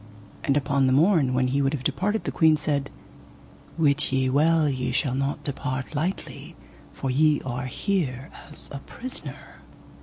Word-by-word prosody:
And 140 Hz, 0 st, +2 dB
upon 140 Hz, -1 st, +2 dB
the 130 Hz, -, +3 dB
morn 150 Hz, -4 st, +4 dB
when 130 Hz, 0 st, +2 dB
he 140 Hz, +2 st, +1 dB
would 135 Hz, +1 st, +1 dB
have 135 Hz, -4 st, -3 dB
departed 195 Hz, +11 st, 0 dB
the -, -, -2 dB
queen 160 Hz, -2 st, +4 dB
said: 145 Hz, -2 st, -1 dB, 0.9 s
Wit 150 Hz, -3 st, +2 dB
ye 130 Hz, -1 st, +1 dB
well 155 Hz, +3 st, +4 dB
ye 130 Hz, -2 st, -1 dB
shall 130 Hz, +1 st, 0 dB
not 135 Hz, +2 st, -2 dB
depart 135 Hz, -1 st, -4 dB
lightly, 165 Hz, +6 st, -4 dB, 0.4 s
for 130 Hz, -, -3 dB
ye 150 Hz, +2 st, +4 dB
are 130 Hz, 0 st, -3 dB
here 140 Hz, -, -2 dB, 0.2 s
as 150 Hz, -, -6 dB
a 140 Hz, -, -4 dB
prisoner. 255 Hz, -, -8 dB
140 Hz, 160 wpm, -25 LUFS, 130-155 Hz, 0.9 s, morn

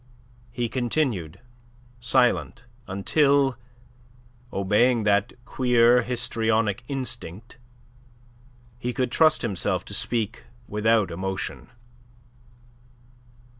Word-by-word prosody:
He 120 Hz, 0 st, -2 dB
continued 120 Hz, -, -2 dB, 0.6 s
silent 120 Hz, 0 st, +1 dB, 0.2 s
until, 135 Hz, +7 st, +2 dB, 1.0 s
obeying 105 Hz, +5 st, +2 dB
that 100 Hz, +2 st, +1 dB
queer 125 Hz, 0 st, +3 dB
histrionic 115 Hz, -3 st, 0 dB
instinct, 120 Hz, -4 st, -6 dB, 1.2 s
he 125 Hz, 0 st, -3 dB
could 125 Hz, -1 st, -1 dB
trust 155 Hz, 0 st, +4 dB
himself 100 Hz, -6 st, -1 dB
to -, -, -7 dB
speak 115 Hz, -1 st, -2 dB, 0.2 s
without 105 Hz, -2 st, +1 dB
emotion. 95 Hz, +2 st, -4 dB
120 Hz, 75 wpm, -25 LUFS, 105-125 Hz, 1.2 s, trust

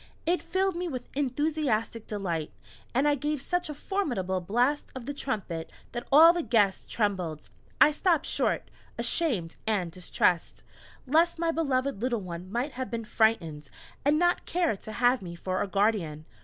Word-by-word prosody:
It 350 Hz, +2 st, +1 dB
filled 375 Hz, +2 st, 0 dB
me 355 Hz, +1 st, -2 dB
with 255 Hz, -6 st, -5 dB
enthusiastic 270 Hz, -5 st, -1 dB
delight, 175 Hz, -7 st, -3 dB, 0.4 s
and 265 Hz, +4 st, +2 dB
I 295 Hz, -, +4 dB
gave 295 Hz, +1 st, -1 dB
such 355 Hz, +4 st, -2 dB
a 300 Hz, -, -5 dB
formidable 240 Hz, -, -1 dB
blast 245 Hz, +10 st, +1 dB
of 255 Hz, -3 st, -6 dB
the 285 Hz, -, -3 dB
trumpet 195 Hz, -, -4 dB, 0.2 s
that 240 Hz, 0 st, -5 dB
all 320 Hz, +4 st, +9 dB
the 350 Hz, -, -1 dB
guests 205 Hz, -9 st, +2 dB
trembled. 185 Hz, -8 st, -1 dB, 0.3 s
I 300 Hz, -, +8 dB
stopped 325 Hz, 0 st, +2 dB
short, -, -, 0 dB, 0.3 s
ashamed 220 Hz, -, 0 dB
and 190 Hz, -6 st, 0 dB
distressed, 180 Hz, -1 st, 0 dB, 0.4 s
lest 325 Hz, +6 st, +3 dB
my 335 Hz, 0 st, +1 dB
beloved 275 Hz, -7 st, 0 dB
little 240 Hz, -3 st, 0 dB
one 180 Hz, 0 st, -7 dB
might 245 Hz, +6 st, -1 dB
have 260 Hz, 0 st, -5 dB
been 230 Hz, -1 st, -4 dB
frightened, 165 Hz, -11 st, +1 dB, 0.3 s
and 290 Hz, +2 st, +3 dB
not 350 Hz, +2 st, +2 dB
care 345 Hz, -8 st, +1 dB
to 215 Hz, -, -9 dB
have 245 Hz, +2 st, +3 dB
me 170 Hz, -2 st, -7 dB
for 185 Hz, +2 st, -2 dB
a 205 Hz, -, 0 dB
guardian. 195 Hz, -7 st, 0 dB
245 Hz, 165 wpm, -28 LUFS, 190-300 Hz, 0.4 s, all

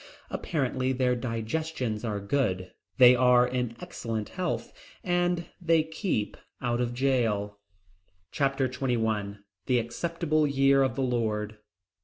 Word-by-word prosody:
Apparently 130 Hz, -4 st, -1 dB
their 125 Hz, -1 st, +1 dB
digestions 120 Hz, 0 st, -3 dB
are 105 Hz, -3 st, -2 dB
good, 100 Hz, -4 st, -1 dB, 0.3 s
they 125 Hz, -1 st, +8 dB
are 125 Hz, 0 st, +5 dB
in 125 Hz, -2 st, -2 dB
excellent 110 Hz, -2 st, -4 dB
health, 185 Hz, -2 st, -3 dB, 0.3 s
and 175 Hz, -1 st, +1 dB, 0.2 s
they 165 Hz, -2 st, +3 dB
keep 160 Hz, -, -2 dB, 0.2 s
out 120 Hz, -1 st, -1 dB
of 120 Hz, 0 st, -2 dB
jail. 115 Hz, -6 st, 0 dB, 0.7 s
Chapter 135 Hz, -2 st, +1 dB
XXI 110 Hz, -6 st, -1 dB, 0.3 s
The 125 Hz, -, +3 dB
Acceptable 155 Hz, +6 st, 0 dB
Year 135 Hz, 0 st, +4 dB
of 130 Hz, -3 st, +1 dB
the 135 Hz, -, -1 dB
Lord. 110 Hz, -4 st, -1 dB
125 Hz, 120 wpm, -28 LUFS, 115-140 Hz, 0.7 s, they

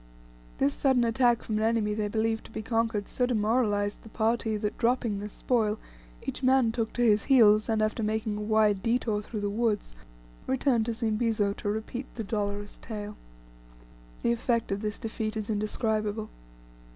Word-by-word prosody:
This 140 Hz, -, +2 dB
sudden 265 Hz, -3 st, +2 dB
attack 235 Hz, 0 st, +3 dB
from 215 Hz, -1 st, -1 dB
an -, -, 0 dB
enemy 220 Hz, -2 st, +1 dB
they 210 Hz, 0 st, -1 dB
believed 220 Hz, +1 st, -1 dB
to -, -, -13 dB
be 220 Hz, -, -5 dB
conquered 225 Hz, -3 st, 0 dB
so 250 Hz, -, 0 dB
demoralized 210 Hz, -3 st, +1 dB
the 220 Hz, -, -13 dB
party 220 Hz, 0 st, 0 dB
that, 210 Hz, 0 st, -2 dB
dropping 235 Hz, -3 st, +1 dB
their 210 Hz, +1 st, -5 dB
spoil, 220 Hz, -1 st, 0 dB, 0.5 s
each -, -, -4 dB
man 260 Hz, -3 st, +4 dB
took 225 Hz, -1 st, -2 dB
to 245 Hz, -, 0 dB
his 215 Hz, -3 st, +4 dB
heels, 215 Hz, -5 st, +5 dB
and 220 Hz, -1 st, +2 dB
after 215 Hz, +2 st, -1 dB
making 215 Hz, 0 st, -1 dB
a 210 Hz, -, -4 dB
wide 210 Hz, -2 st, +2 dB
detour 230 Hz, -2 st, 0 dB
through 210 Hz, 0 st, -6 dB
the 205 Hz, -, 0 dB
woods, 215 Hz, -, -1 dB, 0.5 s
returned 255 Hz, -4 st, +1 dB
to 235 Hz, -, 0 dB
Zimbizo 220 Hz, -2 st, 0 dB
to 205 Hz, -, -4 dB
repeat 220 Hz, +5 st, -4 dB
the 225 Hz, -, -3 dB
dolorous 205 Hz, -1 st, -3 dB
tale. 210 Hz, -2 st, -6 dB, 1.1 s
The 235 Hz, -, +3 dB
effect 235 Hz, -1 st, 0 dB
of 195 Hz, +1 st, -1 dB
this 210 Hz, -1 st, -3 dB
defeat 220 Hz, -1 st, -4 dB
is 215 Hz, 0 st, -3 dB
indescribable. 215 Hz, 0 st, -1 dB
220 Hz, 175 wpm, -28 LUFS, 210-235 Hz, 1.1 s, heels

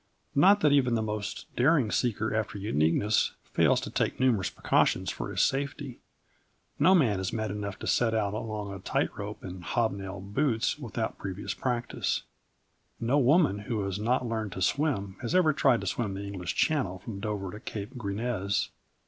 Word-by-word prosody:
Not 195 Hz, +8 st, +6 dB
that 150 Hz, -, +5 dB
even 130 Hz, -4 st, +4 dB
the 110 Hz, -, 0 dB
most 105 Hz, -1 st, -4 dB
daring 130 Hz, -3 st, +3 dB
seeker 110 Hz, -3 st, 0 dB
after 110 Hz, -1 st, -1 dB
uniqueness 100 Hz, +1 st, +2 dB
fails -, -, +3 dB
to -, -, -6 dB
take -, -, -1 dB
numerous 125 Hz, -7 st, +2 dB
precautions -, -, +1 dB
for -, -, -5 dB
his -, -, 0 dB
safety. 140 Hz, -1 st, -2 dB, 0.8 s
No 180 Hz, +6 st, +6 dB
man 115 Hz, -, +3 dB
is 95 Hz, -, -2 dB
mad 110 Hz, -2 st, -2 dB
enough 100 Hz, -2 st, -4 dB
to -, -, -7 dB
set 115 Hz, -2 st, +2 dB
out 105 Hz, -2 st, 0 dB
along 105 Hz, -2 st, -4 dB
a 95 Hz, -, -7 dB
tight -, -, -1 dB
rope 105 Hz, +1 st, -6 dB
in 90 Hz, -1 st, -7 dB
hobnailed 100 Hz, -1 st, -2 dB
boots 135 Hz, -1 st, +1 dB
with 120 Hz, -6 st, -8 dB
out 115 Hz, -, -2 dB
previous 95 Hz, 0 st, -4 dB
practice. 125 Hz, -2 st, -1 dB, 0.8 s
No 125 Hz, +5 st, +2 dB
woman 140 Hz, -, +4 dB
who 105 Hz, +1 st, -2 dB
has 100 Hz, 0 st, -3 dB
not 125 Hz, +4 st, +1 dB
learned 110 Hz, -4 st, -3 dB
to 95 Hz, -, -6 dB
swim 100 Hz, -7 st, 0 dB
has 125 Hz, +7 st, -2 dB
ever 165 Hz, -4 st, +5 dB
tried 135 Hz, -4 st, +3 dB
to -, -, -5 dB
swim 105 Hz, -5 st, -2 dB
the 100 Hz, -, -5 dB
English 95 Hz, -4 st, -4 dB
Channel 130 Hz, -, +1 dB
from 100 Hz, +1 st, -7 dB
Dover 100 Hz, -3 st, -3 dB
to 105 Hz, -, -8 dB
Cape 110 Hz, +4 st, -6 dB
Grisnez. 100 Hz, -3 st, -1 dB
110 Hz, 180 wpm, -29 LUFS, 100-125 Hz, 0.8 s, Not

